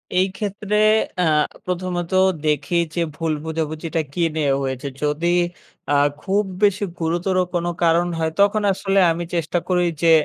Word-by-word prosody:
এই 185 +1 +4
ক্ষেত্রে 210 0 -2 0.5
আ - - +3 0.4
প্রথমত 180 -1 -3 0.4
দেখি 150 +3 +1 0.2
যে 170 - 0
ভুল 165 -1 -1
বোঝাবুঝিটা 160 +1 -2
কী 170 - 0
নিয়ে 150 -3 +1
হয়েছে? 130 +1 -3 0.2
যদি 155 +4 +1 0.6
আ - - +5 0.2
খুব 205 +2 +1 0.2
বেশি 205 0 +3 0.2
গুরুতর 175 +3 0 0.2
কোনো 175 0 0
কারণ 170 +1 +3
হয় 160 -1 0
তখন 205 +1 +3
আসলে 195 +1 +1
আমি 170 +1 -2
চেষ্টা 170 +1 0
করি 180 -1 +2 0.2
যে 165 - +6
175 Hz, 145 wpm, -21 LUFS, 160-185 Hz, 0.6 s, যে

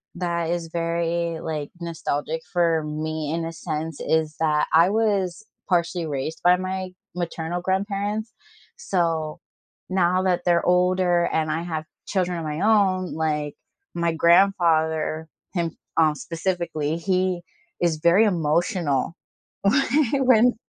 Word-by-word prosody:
that 170 -2 -1
is 170 -1 -2
very, 170 0 -1
like, 150 -3 -4
nostalgic 160 -2 -3
for 165 -3 +2
me 155 0 -3
in 165 0 -2
a 165 - -5
sense, 155 -1 -4
is 155 -1 0
that 150 -2 +2
I 165 +3 +6
was 205 -3 0 0.2
partially 170 -1 +1
raised 150 +1 -4
by 180 +1 +6
my 185 0 -3 0.3
maternal 175 0 -3
grandparents, 205 +4 -2 0.4
so, 165 - -1 0.5
now 185 0 +2
that 180 -2 +1
they're 170 -1 +3
older, 180 -1 +3
and 155 -1 0
I 160 +2 -1
have 160 -2 -4 0.2
children 180 -3 0
of 160 - -5
my 150 +2 -3
own, 195 -4 +2
like, 150 -2 -1 0.4
my 170 -1 0
grandfather 160 -3 +3 0.3
him, 170 -3 -2 0.2
um, 155 -2 +4
specifically 165 -1 -2
he 185 0 0 0.4
is 170 -2 +2
very 170 +7 +5
emotional 170 -3 0 0.5
whe 255 0 +4
170 Hz, 125 wpm, -24 LUFS, 160-185 Hz, 0.5 s, I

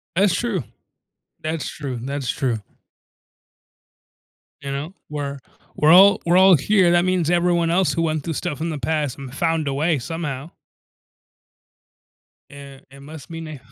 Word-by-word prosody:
That's 195 0 +3
true. 215 - -1 0.8
That's 155 -1 -3
true, 135 -4 -6
that's 140 0 -4
true. 120 -6 -1 2.0
You 140 -1 -5
know, 145 +6 -5 0.2
we're 140 -2 -4 0.4
we're 150 +1 +4
all 195 +3 +7
we're 175 +1 +4
all 190 -1 +7
here, 180 +4 +3
that 175 0 +3
means 180 -3 +1
everyone 175 -1 +2
else 180 +1 +2
who 165 - -1
went 155 -2 -1
through 165 - -3
stuff 155 -1 -4
in 165 - -1
the 155 -3 -4
past 145 0 -2
and 135 -2 -9
found 165 0 0
a 140 - -1
way 155 +2 +1
somehow. 150 0 -5 2.0
An 140 -1 -12
it 140 - -14
must 150 0 -11
mean 165 -1 -7
a 155 -1 -8
155 Hz, 155 wpm, -21 LUFS, 140-175 Hz, 2.0 s, all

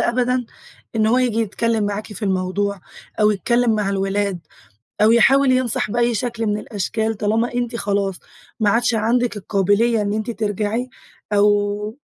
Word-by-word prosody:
أبدًا 250 +1 +1 0.5
إن 215 -1 +3
هو 240 +3 +3
ييجي 240 -3 +1
يتكلّم 225 0 0
معاكِ 205 +1 -3
في 205 - -10
الموضوع، 195 +1 -1 0.4
أو 210 0 +5
يتكلّم 235 +3 +1
مع 210 -2 0
الولاد، 195 -1 -1 0.6
أو 215 - +6
يحاول 270 +3 +5
ينصح 255 -4 0
بأي 240 +1 +1
شكل 230 0 -2
مِن 210 0 0
الأشكال، 220 +1 -2
طالما 220 +4 0
أنتِ 240 -1 -2
خلاص 200 -3 -1 0.5
ما 210 - +3
عَادش 235 +2 +2
عنَدِك 230 +1 +1
القابلية 205 +3 +1
إن 205 0 -1
أنتِ 215 +2 -2
ترجعي، 220 +2 -2 0.4
أو 205 +1 +1
215 Hz, 150 wpm, -20 LUFS, 205-235 Hz, 0.6 s, أو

